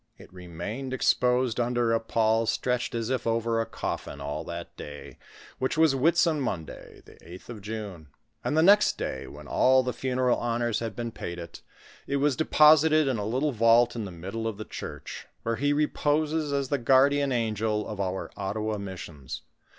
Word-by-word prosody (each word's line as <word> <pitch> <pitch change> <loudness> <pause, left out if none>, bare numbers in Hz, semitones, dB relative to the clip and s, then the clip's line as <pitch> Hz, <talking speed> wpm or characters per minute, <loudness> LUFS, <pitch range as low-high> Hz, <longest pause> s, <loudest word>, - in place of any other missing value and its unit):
It - - -16
remained 95 +9 -6
exposed 125 -2 +2
under 120 -1 +1
a 115 - +3
pall 115 0 +1
stretched 125 0 -1
as 115 +1 -2
if 130 -2 -1
over 115 0 +1
a 115 - -3
coffin 70 - -5
all 70 +1 -4
that 85 0 -7
day, 75 0 -10 0.4
which 130 +4 -1
was 160 -3 +5
Whitsun 160 +3 +3
Monday, 85 -11 -6
the - - -16
8th 90 +5 -13
of 115 -4 -8
Juno; 105 -6 -6 0.4
and 150 - 0
the 160 - +5
next 205 +3 +5
day, - - -4
when - - -11
all 130 0 +4
the 125 -1 -2
funeral 125 0 0
honors 120 -1 -1
had 115 -3 -4
been 115 0 -4
paid 85 -5 -6
it, 85 -1 -9 0.5
it 140 - -1
was 140 -1 +2
de 160 - -1
posited 155 0 +6
in 130 -5 0
a 100 - -3
little 130 +6 0
vault 115 +1 +4
in 115 -3 -3
the 95 - -7
middle 95 +7 -5
of 110 -3 -4
the 110 - -6
church, - - -8 0.2
where 115 0 -1
he 145 +1 +1
reposes 150 +1 0
as 140 -2 -1
the 145 - 0
guardian 135 +3 +4
angel 110 -2 -1
of 105 -2 -6
our 95 0 -3
Ottawa 105 +2 -3
missions. 85 -8 -7
115 Hz, 185 wpm, -27 LUFS, 105-135 Hz, 0.5 s, posited